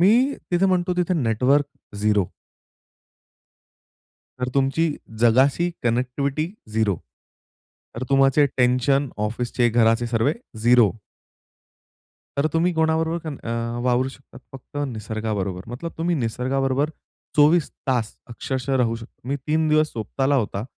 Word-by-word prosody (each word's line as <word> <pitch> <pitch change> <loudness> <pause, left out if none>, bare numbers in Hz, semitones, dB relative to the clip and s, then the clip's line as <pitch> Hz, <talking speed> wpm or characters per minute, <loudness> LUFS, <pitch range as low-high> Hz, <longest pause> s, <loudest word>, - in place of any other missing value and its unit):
मी 235 +9 +5 0.2
तिथे 180 +2 +3
म्हणतो 180 -1 +1
तिथे 180 0 +1
नेटवर्क 135 +1 +2 0.3
0 105 -2 +2 2.1
तर 125 - -1
तुमची 140 +4 +2 0.3
जगाशी 130 +9 +4
कनेक्टिव्हिटी 135 +7 -1 0.2
झिरो. 110 -4 +1 1.0
तर 115 - -4
तुम्हाचे 135 +1 +5
टेन्शन 125 +3 +2 0.2
ऑफिसचे, 120 +2 0
घराचे 115 +1 +3
सर्वे 115 +5 +1 0.3
झिरो. 120 -2 +5 1.5
तर 140 - +3
तुम्ही 170 +2 +2
कोणाबरोबर 160 +1 +1
पण 150 -3 -4
अ, 115 - -4 0.3
वावरू 125 +1 +2
शकतात 135 0 -14
फक्त 135 +2 -12
निसर्गाबरोबर. 110 -5 -3
मतलब 155 +8 -6
तुम्ही 170 +2 +1
निसर्गाबरोबर 135 +3 0 0.5
24 150 +2 +4 0.2
तास 120 -5 0
अक्षरशः 130 +2 -2
राहू 115 -3 +1
शकता. 115 +2 -13
मी 140 - 0
3 155 +1 +1
दिवस 155 0 +3
स्वताला 135 +5 -1
होता. 105 -4 -1
130 Hz, 115 wpm, -23 LUFS, 115-155 Hz, 2.1 s, मी